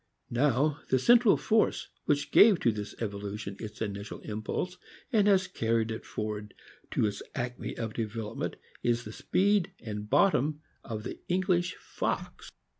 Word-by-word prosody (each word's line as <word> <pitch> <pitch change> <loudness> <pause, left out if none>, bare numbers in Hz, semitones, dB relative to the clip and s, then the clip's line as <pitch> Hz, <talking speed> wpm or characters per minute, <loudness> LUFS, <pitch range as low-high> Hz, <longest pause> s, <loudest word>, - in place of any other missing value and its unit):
Now 140 +4 +2
the 130 - +4
central 235 - +6
force 220 0 +1 0.2
which 145 -1 +1
gave 210 -4 +7
to 115 - +4
this 105 -1 -6
evolution 100 -1 -4
its 110 0 -5
initial 100 0 -5
impulse, 110 +12 -3 0.4
and 210 -2 +4
has 190 -2 +5
carried 115 0 0
it 110 - -6
for 110 - -3
ward 105 -1 -5 0.3
to - - +1
its 105 - -2
acme 125 0 -4
of 110 -2 -3
development, 110 -1 -3 0.3
is 120 0 +1
the 110 - -8
speed 195 - +2
and 105 -2 -6
bottom 150 -1 +3 0.2
of 110 -2 -5
the - - -6
English 180 -1 +1
fox. - - -4
120 Hz, 150 wpm, -30 LUFS, 105-180 Hz, 0.4 s, gave